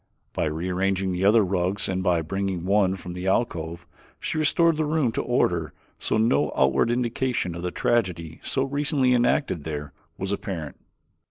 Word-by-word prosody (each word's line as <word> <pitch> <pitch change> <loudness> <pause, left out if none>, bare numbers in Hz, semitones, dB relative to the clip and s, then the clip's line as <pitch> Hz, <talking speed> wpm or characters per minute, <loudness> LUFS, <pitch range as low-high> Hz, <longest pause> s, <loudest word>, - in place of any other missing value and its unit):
By - - 0
rearranging 95 +4 -1
the 90 +1 -2
other 110 +2 +6
rugs 95 +1 -1
and 95 0 -1
by 90 -3 +2
bringing 95 +1 -2
one 100 -1 +3
from 90 -2 -8
the 90 +1 -5
alcove 85 -5 -1 0.3
she - - -2
restored 165 +1 +3
the 155 - +1
room 150 -5 +1
to - - -1
order 85 -10 0 0.3
so - - 0
no 75 -10 +2
outward 65 - +3
indication 120 -5 -1
of 85 - -6
the 90 - -2
tragedy 90 -7 -1
so 135 - -1
recently 140 -2 +1
enacted 120 - +1
there 75 -2 -5 0.2
was 95 +1 -3
apparent. 90 -8 -4
95 Hz, 165 wpm, -25 LUFS, 85-120 Hz, 0.3 s, other